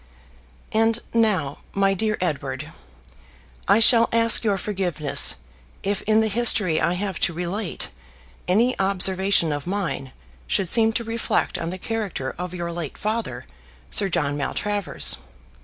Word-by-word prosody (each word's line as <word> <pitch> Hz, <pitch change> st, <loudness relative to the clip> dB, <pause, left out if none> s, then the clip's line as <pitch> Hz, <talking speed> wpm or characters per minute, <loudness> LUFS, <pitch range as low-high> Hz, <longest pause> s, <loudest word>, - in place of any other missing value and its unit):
And 225 Hz, +1 st, +2 dB, 0.2 s
now, 195 Hz, -12 st, +1 dB, 0.2 s
my 195 Hz, 0 st, +2 dB
dear 215 Hz, +2 st, -1 dB
Edward, 160 Hz, -6 st, -3 dB, 1.0 s
I 215 Hz, -, +5 dB
shall 230 Hz, 0 st, +7 dB
ask 230 Hz, 0 st, +5 dB
your 205 Hz, -3 st, +1 dB
forgiveness 180 Hz, -7 st, +1 dB, 0.5 s
if 200 Hz, 0 st, -1 dB
in 220 Hz, 0 st, +4 dB
the 220 Hz, -, +1 dB
history 210 Hz, -6 st, +3 dB
I 170 Hz, -, +1 dB
have 190 Hz, -1 st, -4 dB
to 175 Hz, -, 0 dB
relate 180 Hz, +3 st, -4 dB, 0.6 s
any 230 Hz, +7 st, +3 dB
observation 190 Hz, -2 st, +2 dB
of 145 Hz, +2 st, -6 dB
mine 180 Hz, -9 st, -3 dB, 0.4 s
should 175 Hz, -, 0 dB
seem 225 Hz, +2 st, +5 dB
to 235 Hz, -, -2 dB
reflect 230 Hz, 0 st, -2 dB
on 165 Hz, -, -3 dB
the 185 Hz, -, -5 dB
character 195 Hz, -10 st, -4 dB
of 180 Hz, 0 st, -5 dB
your 170 Hz, -1 st, -4 dB
late 170 Hz, -4 st, -6 dB
father, 215 Hz, -, -4 dB, 0.5 s
Sir 195 Hz, -, +3 dB
John 145 Hz, -4 st, -1 dB
Maltravers. 205 Hz, +7 st, -1 dB
195 Hz, 140 wpm, -23 LUFS, 170-220 Hz, 1.0 s, shall